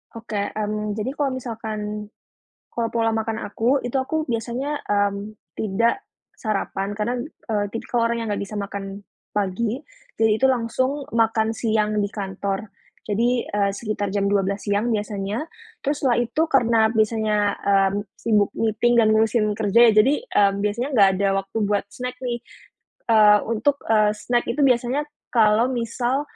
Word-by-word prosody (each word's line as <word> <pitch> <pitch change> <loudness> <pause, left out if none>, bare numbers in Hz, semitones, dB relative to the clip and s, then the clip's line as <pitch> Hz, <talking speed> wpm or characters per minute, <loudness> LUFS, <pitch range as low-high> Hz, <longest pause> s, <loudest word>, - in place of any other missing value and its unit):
Oke, 225 -2 -4 0.2
mmm, 210 0 -2
jadi 215 +4 -2
kalau 275 -2 -1
misalkan 215 -4 -5 0.6
kalau 235 -1 -2
pola 230 -1 +2
makan 220 0 -2
aku 245 +6 0
itu 245 +2 -2
aku 310 +3 -2
biasanya, 240 +6 -2
mmm, 205 +1 0 0.2
tidak 230 - 0 0.3
sarapan 200 -2 -2
karena, 215 +4 -2 0.3
eee, 205 -2 +1
tik 230 - -6
kalau 235 -1 +2
orangnya 230 -1 -2
nggak 205 - -2
bisa 200 - -11
makan 200 -1 -5 0.3
pagi, 210 +5 -1 0.4
jadi 220 -1 +4
itu 265 - +2
langsung 260 +3 +1
makan 225 -1 +2
siang 215 -2 0
di 205 -1 0
kantor. 195 0 -4 0.4
Jadi, 235 +4 +2
eee, 200 -1 +1
sekitar 205 -1 -3
jam 200 -1 +1
12.00 200 0 0
siang 215 +4 +1
biasanya 210 +5 -3 0.3
terus 285 +1 -1
setelah 240 -2 +3
itu 245 +6 -1
karena 235 -6 +3
biasanya, 220 -1 +1 0.2
mmm, 195 -1 +2 0.2
sibuk 210 -3 +1
meeting 225 +2 +1
dan 220 - +4
ngurusin 220 +1 +3
kerja 220 0 +2
ya - - +5
jadi, 245 +7 +6 0.2
eee, 200 -1 +4
biasanya 210 +5 -1
nggak 200 -5 +6
ada 200 +1 +1
waktu 195 +3 -8
buat 205 0 +1
snack 250 +2 -5
nih. 245 -2 -2 0.7
Eee, 210 -2 +7
untuk, 230 +6 +1
eee, 210 -1 +4
snack 240 +3 -1
itu 295 - -1
biasanya 255 +1 +2 0.3
kalau 220 0 +4
misal 245 +2 -1
220 Hz, 155 wpm, -23 LUFS, 205-240 Hz, 0.7 s, Eee